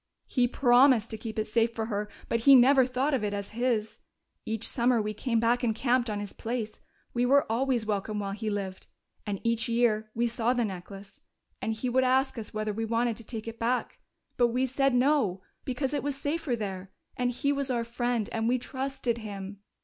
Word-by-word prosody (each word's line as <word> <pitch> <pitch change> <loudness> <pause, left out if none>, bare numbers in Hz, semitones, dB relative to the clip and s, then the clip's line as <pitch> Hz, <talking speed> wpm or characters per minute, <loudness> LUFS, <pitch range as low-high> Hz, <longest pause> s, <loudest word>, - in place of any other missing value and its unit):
"He 245 -2 +2
promised 245 -2 +4
to 220 - -4
keep 220 0 -6
it 215 - 0
safe 230 +1 +1
for 225 - -2
her, 210 -1 -3 0.2
but 230 - 0
he 275 +4 +7
never 260 +1 +6
thought 260 +4 0
of 255 -5 +1
it 205 -1 -1
as 200 0 -5
his. 225 -2 -1 0.5
Each 220 -1 -2
summer 240 -1 +2
we 215 0 -2
came 230 +2 0
back 240 +2 +2
and 225 -3 +1
camped 245 0 +1
on 210 -1 -2
his 205 -1 -6
place 225 -2 -4 0.3
we 240 - +1
were 275 +3 +4
always 245 -1 +1
welcome 210 0 -2
while 200 -1 -2
he 215 +2 -3
lived 195 -2 -4 0.4
and 200 -2 -2
each 230 0 0
year 225 -2 +2
we 235 +1 +1
saw 235 +1 +1
the 240 -2 +1
necklace, 195 +1 -9 0.4
and 225 - -1
he 220 +3 -3
would 255 +1 +2
ask 260 0 +2
us 215 - -7
whether 215 0 -2
we 225 +2 -3
wanted 230 +1 0
to 230 - -9
take 225 0 -6
it 230 0 -7
back. 240 +2 -1 0.4
But 240 - +5
we 250 +3 0
said 270 0 +1
no, 245 -8 +2 0.2
because 265 +1 -2
it 290 - 0
was 285 -1 -2
safer 290 -1 -2
there, 195 -3 -5 0.2
and 250 0 0
he 255 +3 0
was 280 -1 -1
our 240 -2 0
friend, 235 -1 -1
and 225 0 0
we 255 - +3
trusted 260 -2 -3
him. 200 -2 -7
235 Hz, 210 wpm, -28 LUFS, 215-255 Hz, 0.5 s, he